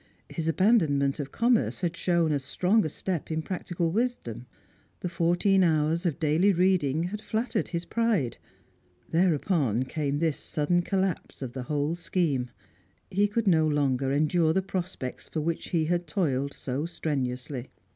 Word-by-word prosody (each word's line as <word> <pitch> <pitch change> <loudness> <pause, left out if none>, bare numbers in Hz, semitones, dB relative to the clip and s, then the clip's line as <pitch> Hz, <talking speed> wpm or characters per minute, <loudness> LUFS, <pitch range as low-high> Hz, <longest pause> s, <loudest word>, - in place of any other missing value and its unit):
His 165 -2 -4
abandonment 160 -6 +3
of 140 -2 -4
commerce 235 -3 +1
had 170 -2 -1
shown 170 -2 +1
as 140 -2 0
a - - -12
strong 180 +2 +2
step 175 +1 -3
in 160 0 -2
practical 175 -1 -2
wisdom; 170 - -2 0.5
the 180 - -2
fourteen 175 +3 +3
hours 160 +1 +2
of 155 - -1
daily 165 +5 +3
reading 175 -5 +2
had 205 +4 -4
flattered 220 +1 -1
his 170 -1 -3
pride. 215 - 0 0.7
Thereupon 160 - +2
came 145 +1 -2
this 160 -1 0
sudden 165 +4 0
collapse 190 -5 -2
of 120 -2 -6
the 130 - -4
whole 150 +1 0
scheme. 165 -7 -1 0.6
He 200 +2 +3
could 225 +2 -1
no 160 -4 +4
longer 135 -3 +1
endure 155 +3 +2
the 190 +2 +1
prospects 185 -8 -5
for 155 - -2
which 165 +2 -2
he 165 -3 +1
had 175 +1 0
toiled 140 -5 0
so 140 +5 -3
strenuously. 130 -5 -3
165 Hz, 155 wpm, -27 LUFS, 145-185 Hz, 0.7 s, no